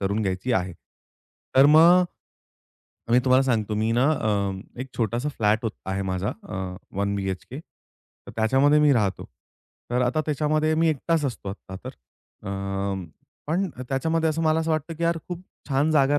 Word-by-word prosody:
करून 100 +2 0
घ्यायची 95 +5 -1
आहे. 90 -3 0 0.8
तर 135 +1 +8
मग 170 +4 +7 1.1
मी 120 - +6
तुम्हाला 130 0 +5
सांगतो 110 -4 0
मी 110 +2 0
ना 120 +3 +3
अ, 100 -5 -2
एक 135 - -5
छोटासा 120 +4 -1
फ्लॅट 110 -6 +1
होत 115 - -1 0.2
आहे 95 +1 -2
माझा 95 +2 -1 0.2
अ, 105 - -6 0.4
वन 100 0 0
बीएचके 95 +7 -4
तर - - -20
त्याच्यामध्ये 135 +7 +4
मी 150 -1 +5
राहतो. 105 -6 0 0.7
तर 125 +1 +1
आता 125 +5 +1
त्याच्यामध्ये 155 +1 +1
मी 165 +1 +3
एकटाच 160 +1 0
असतो 120 -7 -4
आता 95 -1 -8
तर. 130 - -5 0.6
अ, - - -3 1.0
पण 180 +6 0 0.2
त्याच्यामध्ये 160 +4 +1
असं 160 +1 -1
मला 160 0 +3
असं 160 0 -2
वाटतं, 155 +1 -1
की 170 - -7
यार 170 0 +1
खूप 180 0 -5 0.3
छान 145 +3 +2
जागा 145 -1 +3
130 Hz, 165 wpm, -25 LUFS, 105-155 Hz, 1.1 s, तर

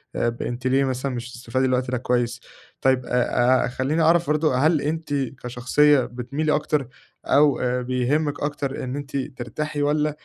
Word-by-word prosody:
أب 120 0 -1
أنتِ 120 +1 -3
ليه 135 +2 +3
مثلًا 130 0 -2
مش 120 +1 -6
بتستفادي 125 +2 -1
من 130 - +1
الوقت 125 0 0
ده 130 - 0
كويس. 120 -1 -1 0.4
طيب، 130 -1 +2
أ 125 +1 +2
أ - - -2
خلّيني 130 +6 -1
أعرف 170 +1 +4
برضه 150 -2 +2
هل 155 +2 +3
أنتِ 160 0 -3
كشخصية 135 +2 +2
بتميلي 135 +6 -1
أكتر 150 -3 -1 0.4
أو 145 -2 +4
آآ 125 0 0
بيهمِّك 130 +4 0
أكتر 145 -2 -3
إن 130 +1 -4
أنتِ 145 0 -5
ترتاحي 145 +3 -4
والّا 150 +1 +2
130 Hz, 170 wpm, -23 LUFS, 125-150 Hz, 0.4 s, أعرف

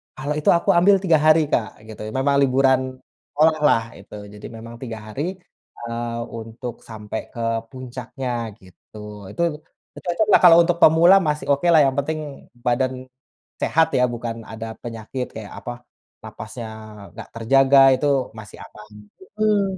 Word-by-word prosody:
kalau 145 +3 -3
itu 150 - +1
aku 170 - +1
ambil 185 +4 +5
3 170 -4 +4
hari, 155 +1 +5
Kak, 110 -4 -1
gitu, 110 - -10
memang 135 +3 +1
liburan 130 0 +3 0.5
sekolah 155 +1 +3
lah 115 - +3 0.2
itu. - - -13 0.2
Jadi 105 - -11
memang 115 +1 -10
3 115 -3 -7
hari, 135 +7 -4 0.6
eee, 115 0 -4 0.2
untuk 115 +2 -8
sampe 110 -1 -7
ke - - -10 0.3
puncaknya 125 -2 -6
gitu. 95 +3 -18 0.3
Itu 170 - -5 0.5
itu - - -9
cocok 180 +4 0
lah 170 -2 +7
untuk 170 0 0
pemula, 165 +4 +7
masih 150 0 -2
oke 140 +5 +1
lah, 160 - +6
yang 135 -1 0
penting 155 +3 -2 0.5
badan 130 +1 -1 0.5
sehat 160 0 +3
ya, 125 - +3
bukan 115 -1 -5
ada 110 0 -7
penyakit, 120 +2 -5
kaya 105 -3 -8
apa, 120 0 -8 0.4
nafasnya 115 +2 -8 0.5
nggak 110 - -10
terjaga 135 +4 +4 0.2
itu 145 +3 -1 0.3
masih 110 -2 -11
aman. 105 0 -15 0.5
Mhm. 210 -1 +3
130 Hz, 150 wpm, -21 LUFS, 115-150 Hz, 0.6 s, lah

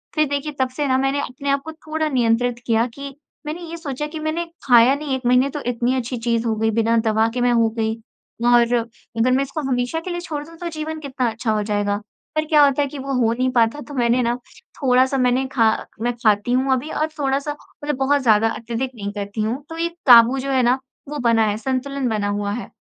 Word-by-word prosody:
फ़िर 305 - +3
देखिए, 285 +1 -2
तब 260 - +2
से 290 -1 0
ना 260 - +2
मैंने 270 +1 0
अपने 280 +3 -5
आप 275 0 +2
को 320 - -5
थोड़ा 315 0 -3
नियंत्रित 240 -1 +1
किया 230 0 +3
कि 280 -1 -8 0.3
मैंने 310 +4 -5
ये 335 - -6
सोचा 295 -2 -4
कि 315 +1 -7
मैंने 315 +2 -2 0.2
खाया 245 +1 +6
नहीं 285 -2 -2
1 260 - -5
महीने 250 +2 +4
तो 295 - -5
इतनी 245 +1 0
अच्छी 250 0 -3
चीज़ 230 0 -1
हो 220 - +1
गई, 225 0 +1
बिना 230 +1 +2
दवा 220 0 +3
के 245 - -1
मैं 245 0 +3
हो 230 -1 +3
गई, 220 0 0 0.5
और 240 0 +6
अगर 235 +1 -2
मैं 270 +2 +3
इसको 275 +3 -5
हमेशा 245 +5 0
के 365 - -7
लिए 350 - -3
छोड़ 300 -4 -5
दूँ 330 - -14
तो 345 0 -4
जीवन 315 0 -5
कितना 260 -4 -2
अच्छा 220 0 -2
हो 210 -1 0
जाएगा। 205 -1 0 0.4
पर 310 0 +1
क्या 300 -1 +5
होता 280 +1 +2
है 280 - -1
कि 275 0 -8
वो 275 +1 -4
हो 225 0 +3
नहीं 255 +2 0
पाता, 235 +4 +2
तो 290 - -10
मैंने 245 -1 +2
ना 235 +1 +1 0.5
थोड़ा-सा 260 +1 +3
मैंने 255 +1 +2
खा 225 -4 +4 0.3
मैं 240 +1 0
खाती 210 +2 +2
हूँ 265 +1 +2
अभी 260 +4 -2
और 310 +1 0
थोड़ा-सा 275 +1 0 0.3
मतलब 295 -1 -1
बहुत 275 +1 +2
ज़्यादा, 225 -1 +4
अत्यधिक 235 +3 -4
नहीं 205 -2 -5
करती 205 +1 -4
हूँ। 240 +6 -2
तो 325 - -7
ये 335 +1 0 0.2
काबू 240 +2 +8
जो 275 +1 -3
है 260 - +3
ना, 250 +2 +3 0.3
वो 295 - -4
बना 225 -1 +4
है, 210 0 -1
संतुलन 265 +2 -2
बना 210 -2 -1
हुआ 205 0 -2
है। 240 - -6
255 Hz, 235 wpm, -21 LUFS, 230-285 Hz, 0.5 s, काबू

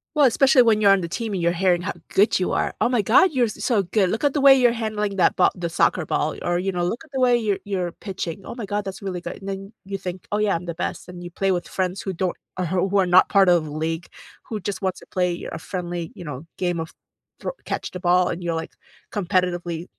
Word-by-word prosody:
Well, 295 -2 +5
especially 265 +1 +5
when 220 -2 +3
you're 200 -1 +6
on 195 -1 +4
the 170 - -3
team 215 +5 -4
and 185 - -1
you're 170 0 +3
hearing 175 0 +2
how 200 - -2 0.2
good 200 +1 +3
you 185 - 0
are. - - 0
"Oh - - +3
my 245 -3 +2
god. 370 - +5
You're 250 -5 +2
so 210 0 0
good. 190 +1 +1
Look 225 +8 -2
at 285 -2 +3
the 290 - 0
way 275 -1 +9
you're 250 -2 +4
handling 215 -3 -2
that 180 - +3
ba 180 - +5
the 175 -2 -4
soccer 175 +1 +2
ball, 155 +1 -1
or, 175 0 0
you 190 +2 -1
know, 175 -1 -2
look 225 - -2
at 310 - -25
the 265 - -1
way 250 -1 +4
you're 210 -4 -1
you're 185 -4 -2
pitching, 190 -2 -6
oh - - -8
my 235 -4 -5
god, 205 0 -2
that's 195 +1 -6
really 185 -3 -4
good." - - -6
And 195 - -10
then 195 +1 -5
you 195 0 -4
think, 185 -1 -6
"Oh, 210 - +1
yeah. 210 -3 +2
I'm 170 +1 -4
the 170 - -4
best." 170 - -4
And 180 -1 -9
you 175 - -6
play 195 +2 0
with 175 -2 -1
friends 185 0 -2
who 190 - -4
don't 180 +1 -1 0.3
who 190 +2 +1
are 190 - +4
not 180 +1 +5
part 195 -2 +5
of 170 -3 +3
league, 160 +3 -3 0.4
who 220 - -3
just 200 0 -4
wants 190 -2 -1
to - - -15
play 180 -2 -1
a - - -5
friendly, 175 -2 -5
you 175 - -9
know, 145 0 -7
game 175 -2 -1
of 160 0 -5 0.5
thr - - -4 0.2
catch - - -3
the 180 - -6
ball, 180 0 +3
and 175 +1 -4
you're, 170 -1 -1
like, 160 - -5 0.4
competitively 175 -3 -1
190 Hz, 265 wpm, -23 LUFS, 175-210 Hz, 0.5 s, way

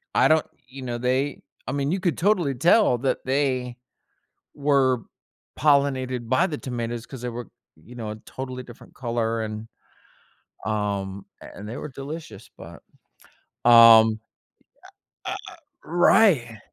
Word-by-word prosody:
I - - +5
don't 155 -1 +3 0.2
you 135 +2 -10
know, 120 -1 -3
they 130 +3 -1 0.3
I - - -2
mean, 140 +1 -1
you 190 - 0
could 180 -3 -1
totally 175 -7 +1
tell 175 - +4
that 130 +2 -1
they 130 -2 -1 0.8
were 135 -4 +2 0.6
pollinated 130 -4 +1
by 150 +9 +3
the 155 - -4
tomatoes, 120 -2 -4
'cause 130 -3 -10
they 125 - -3
were, 120 -2 -7 0.3
you 110 +11 -16
know, 110 -3 -5
a - - -8
totally 130 -1 -6
different 120 -2 -15
color 115 -2 -2
and, 110 0 -6 1.0
um 100 -2 -3 0.2
a - - -12
and 105 +1 -8
they 120 - -6
were 150 - -6
delicious, 145 +5 -9
but, - - -12 0.9
um 115 -2 +8 1.1
Uh - - -2
uh - - -11
uh - - -14 0.3
Right. 165 - +3
125 Hz, 145 wpm, -24 LUFS, 115-140 Hz, 1.1 s, um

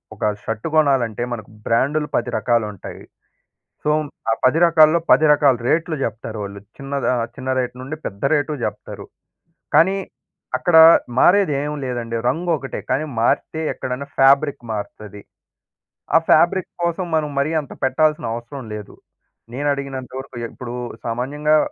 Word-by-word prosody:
ఒక - - -8 0.2
షర్ట్ 110 +5 -4
కొనాలంటే 135 -8 +2
మనకు 110 -3 -7 0.2
బ్రాండులు 145 +6 +1
10 120 +1 0
రకాలుంటాయి. 110 -5 -2 0.8
సో, 150 - +1 0.4
ఆ - - +3
10 130 +5 +4
రకాల్లో 160 0 +5
10 145 +5 +6
రకాల 145 -4 +4
రేట్లు 165 +1 +1
జెప్తారు 110 -1 -4
వాళ్ళు. 100 0 -8 0.2
చిన్నదా 140 -1 -2 0.2
చిన్న 130 -1 -4
రేట్ 125 -1 -2
నుండి 140 +4 -6
పెద్ద 100 0 -7
రేటు 150 0 0
జెప్తారు. - - -6 0.7
కానీ, 190 +4 +5 0.6
అక్కడ 175 - +1 0.4
మారేది 190 -2 +4
ఏమి 150 +1 -3
లేదండి. 120 -2 -4
రంగు 170 +6 -1
ఒకటే. 135 -1 -6
కానీ 155 +3 0 0.2
మారితే 160 +6 0
ఎక్కడైనా 130 +2 -5
ఫ్యాబ్రిక్ 140 +1 +4
మారతది. 105 0 -7 0.9
ఆ - - +10
ఫాబ్రిక్ 175 +3 +4
కోసం 170 +2 -1
మనం 155 -1 0
మరీ 140 +3 0
అంత 145 - -14
పెట్టాల్సిన 150 +2 +1
అవసరం 120 +4 -7
లేదు. 105 -1 -8 0.6
నేనడిగినంత 140 -2 -3
వరకు 135 -1 -10 0.2
ఇప్పుడు 120 -1 -7 0.3
సామాన్యంగా 145 +6 +1
135 Hz, 135 wpm, -20 LUFS, 120-155 Hz, 0.9 s, ఆ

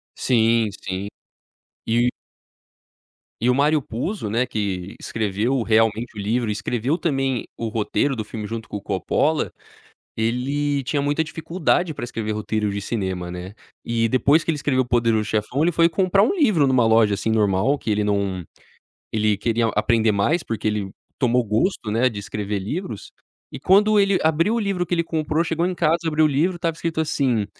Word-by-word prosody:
Sim, 115 -2 +2
sim. 95 +1 -4 0.8
E 120 +2 +2 1.3
E 120 - +2
o 125 - +4
Mário 150 +1 +3
Puzo, 125 - -4
né, 120 +4 +1
que 100 -5 -3
escreveu 110 +4 -1
realmente 115 +1 +1
o - - -7
livro, 110 +3 0
e - - 0
escreveu 125 +8 -1
também 135 -7 -1
o 115 - -3
roteiro 115 +5 0
do 110 - -3
filme 105 -1 -6
junto 115 0 -6
com - - -4
o 100 - -9
Coppola, 145 +10 0 0.6
ele 135 +5 -1
tinha 140 +2 -1
muita 145 +3 +1
dificuldade 165 +1 -1
para 120 - -7
escrever 115 -2 -3
roteiros 105 -1 -2
de 100 - -3
cinema, 95 -5 -3
né. 90 +2 -7 0.3
E 115 -1 +1
depois 140 +5 +3
que - - 0
ele 155 - -2
escreveu 135 -3 +1
O 125 - -12
Poderoso 115 -3 +2
Chefão, 110 +7 -1
ele 175 - +3
foi 165 0 +4
comprar 190 +3 +3
um 245 - +2
livro 215 - +3
numa 125 -3 +3
loja, 110 -2 +4
assim, 105 +3 -2
normal, 105 +5 +2
que 115 - -6
ele 105 0 +1
não 100 -3 -1 0.7
ele 105 -1 +2
queria 115 +2 +1
a - - +1
aprender 110 0 +2
mais, 125 - +1
porque 110 -1 -4
ele 105 -2 -2 0.3
tomou 125 -1 +2
gosto, 110 - 0
né, 115 +4 +3
de 105 - -7
escrever 100 0 -3
livros. 110 - -5 0.4
E - - -6
quando 210 +3 +4
ele 200 -2 +3
abriu 165 +7 +2
o 235 - 0
livro 195 -3 -1
que 175 - -9
ele 170 -1 0
comprou 155 0 0
chegou 165 0 -1
em 185 - -1
casa, 165 0 +2
abriu 155 0 +3
o - - +2
livro, 165 +6 +1
estava 170 -2 -1
escrito 165 -1 -2
assim, 130 -8 0
120 Hz, 185 wpm, -22 LUFS, 105-155 Hz, 1.3 s, o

